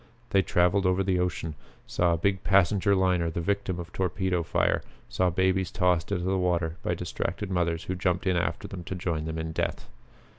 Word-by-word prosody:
They 100 - +5
traveled 90 +2 +2
over 90 +1 +2
the 95 -1 +1
ocean; 85 -3 -2 0.3
saw 85 -1 +1
a - - +1
big 95 +3 0
passenger 95 +2 +4
liner 90 -3 +2
the 80 - -3
victim 100 0 -1
of 85 - -8
torpedo 95 -1 0
fire; 80 - +1 0.3
saw 90 -1 +1
babies 95 0 +1
tossed 90 -3 +1
into 90 -3 0
the 95 +1 +1
water 85 -2 0
by - - -1
distracted 95 +3 -4
mothers 85 -2 0
who 95 - -3
jumped 90 0 0
in 95 -1 +2
after 85 -1 -1
them 90 -3 -7
to 95 - -4
join 85 -4 -2
them 80 0 -4
in 80 0 -3
death. - - -2
90 Hz, 195 wpm, -27 LUFS, 85-95 Hz, 0.3 s, They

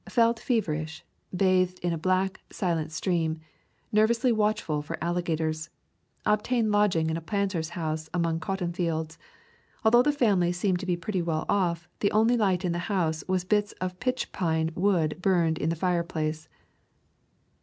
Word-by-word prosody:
Felt 230 -1 +3
fever 225 - 0
ish; 160 +1 -6 0.3
bathed 185 -1 +2
in 175 -1 +1
a - - -2
black, 185 +3 0
silent 165 -4 -1
stream; 160 -1 -1 0.5
nervously 230 +4 +3
watchful 210 -8 0
for 145 - -5
alligators. 165 -2 -1 0.6
Obtained 215 +1 +2
lodging 185 -6 +2
in 160 - -1
a - - -5
planter's 190 -3 -1
house 155 -1 -3
among 165 -2 0
cotton 175 +1 -3
fields. 160 -2 -2 0.7
Although 240 +2 +7
the 295 - +3
family 205 -11 +2
seemed 180 0 0
to 190 - -6
be 175 -1 +1
pretty 180 +2 -2
well 160 -2 -1
off, 175 -4 0
the 200 - +2
only 225 +3 +4
light 190 -5 +1
in 175 - +1
the 170 - -1
house 160 -6 0
was 185 -1 +1
bits 205 +2 +1
of 180 0 -5
pitch 255 0 -2
pine 160 -3 0
wood 175 -4 +1
burned 170 -4 +2
in 155 - 0
the 165 - 0
fireplace. 160 -3 -1
180 Hz, 160 wpm, -27 LUFS, 160-205 Hz, 0.7 s, Although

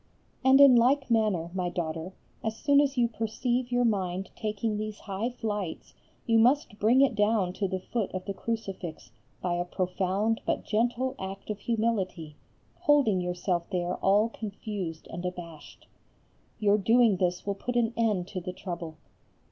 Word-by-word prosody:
And 265 +1 +6
in 280 -3 +9
like 260 +2 +3
manner, 205 -7 +1
my 180 -2 -1
daughter, 165 +1 -4 0.3
as 220 0 -2
soon 285 -1 +4
as 280 -2 0
you 240 -1 +4
perceive 240 +3 -2
your 245 0 +2
mind 190 -3 -1
taking 215 -1 -2
these 215 0 -5
high 205 +3 -3
flights 210 -8 -4 0.3
you 225 -2 +4
must 245 -2 +3
bring 235 +6 +5
it 275 -3 +4
down 205 -3 +2
to 195 +1 -1
the 190 0 -2
foot 215 +2 -3
of 185 0 -5
the 200 - -3
crucifix 195 - -5 0.3
by 180 -1 0
a 175 0 0
profound 190 +4 -1
but - - -1
gentle 240 +4 0
act 195 +2 -6
of 210 - -5
humility, 195 -10 -1 0.4
holding 285 - +3
yourself 180 -1 -2
there 180 -2 -1
all 205 +4 +3
confused 200 -6 -6
and 175 +1 -6
abashed. 170 -4 -8 0.7
Your 210 0 +3
doing 225 0 +4
this 180 -1 -1
will 200 - 0
put 245 +5 -5
an 235 -1 +2
end 210 -6 +1
to 185 - -4
the 180 +1 -5
trouble. 170 -4 -6
205 Hz, 165 wpm, -28 LUFS, 180-230 Hz, 0.7 s, in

